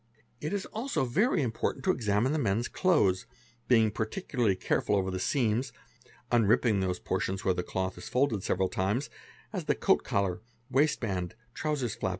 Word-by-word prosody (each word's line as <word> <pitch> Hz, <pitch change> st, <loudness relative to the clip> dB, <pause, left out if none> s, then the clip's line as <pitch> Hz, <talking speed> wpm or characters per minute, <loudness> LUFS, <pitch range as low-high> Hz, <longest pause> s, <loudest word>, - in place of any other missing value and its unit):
It 150 Hz, +5 st, -3 dB
is 205 Hz, -1 st, -2 dB
also 225 Hz, -, -2 dB
very 180 Hz, -, +2 dB
important 115 Hz, +8 st, -2 dB
to 190 Hz, -, +5 dB
examine 115 Hz, -, +1 dB
the 155 Hz, -, 0 dB
man's 115 Hz, -1 st, +1 dB
clothes, 100 Hz, -, +2 dB, 0.4 s
being 115 Hz, -3 st, +4 dB
parti 110 Hz, -, -3 dB
ularly 115 Hz, -, +1 dB
careful 105 Hz, -, +1 dB
over 95 Hz, -1 st, 0 dB
the 95 Hz, -, -3 dB
seams, 120 Hz, -, +1 dB, 0.6 s
unripping 115 Hz, -2 st, +3 dB
those 90 Hz, -1 st, 0 dB
portions 95 Hz, +2 st, -2 dB
where 95 Hz, -, +4 dB
the 90 Hz, 0 st, -4 dB
oth 95 Hz, 0 st, -1 dB
is 110 Hz, -, -8 dB
folded 125 Hz, -5 st, +1 dB
several 95 Hz, 0 st, +1 dB
times, 105 Hz, +10 st, -1 dB, 0.4 s
as -, -, -3 dB
the -, -, +2 dB
coat -, -, +2 dB
collar, 100 Hz, 0 st, 0 dB, 0.3 s
waist 145 Hz, +4 st, +2 dB
band, 95 Hz, -4 st, -2 dB, 0.2 s
trousers 145 Hz, -7 st, -1 dB
flap -, -, -2 dB
110 Hz, 170 wpm, -29 LUFS, 95-135 Hz, 0.6 s, to